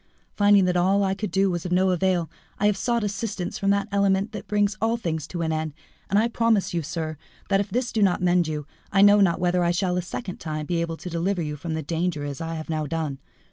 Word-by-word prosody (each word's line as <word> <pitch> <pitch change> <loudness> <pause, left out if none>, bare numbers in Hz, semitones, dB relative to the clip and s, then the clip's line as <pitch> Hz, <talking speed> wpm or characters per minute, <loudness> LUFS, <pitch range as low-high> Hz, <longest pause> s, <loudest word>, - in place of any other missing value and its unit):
Finding 205 -2 +5
that 180 0 +1
all 190 +3 +3
I 190 -1 +1
could 205 +1 -4
do 190 +2 +2
was 175 -2 -3
of 180 - -5
no 185 +1 +3
avail, 180 -1 +1 0.3
I 205 - 0
have 210 -1 +4
sought 235 +3 0
assistance 205 -2 -3
from 195 - +1
that 200 +1 +1
clement 200 +1 +1
which 210 - -7
brings 205 0 +1
all 225 +1 +2
things 160 -9 -3
to 170 -2 -4
an 160 - 0
end, 155 -1 -2 0.3
and 200 - +2
I 220 +2 +4
promise 230 -5 +1
you, 170 - 0
sir, 155 0 -4 0.3
that, 195 -1 +3
if 200 0 -2
this 245 +4 -1
do 220 - 0
not 190 -3 +3
mend 175 -1 +2
you, 150 -2 -3 0.3
I 195 0 +5
know 205 0 +7
not 190 -4 +3
whether 180 0 +2
I 170 - +2
shall 180 +1 0
a - - +1
second 185 +2 -6
time 155 -1 -4
be 170 +1 -1
able 165 -1 -3
to 180 - -7
deliver 175 +2 0
you 150 -1 -3
from 160 +2 -4
the 160 - -3
danger 165 -1 -2
as 140 0 -5
I 165 0 -3
have 155 -1 -6
now 155 -2 -2
done. 155 -3 -3
180 Hz, 255 wpm, -25 LUFS, 165-200 Hz, 0.3 s, know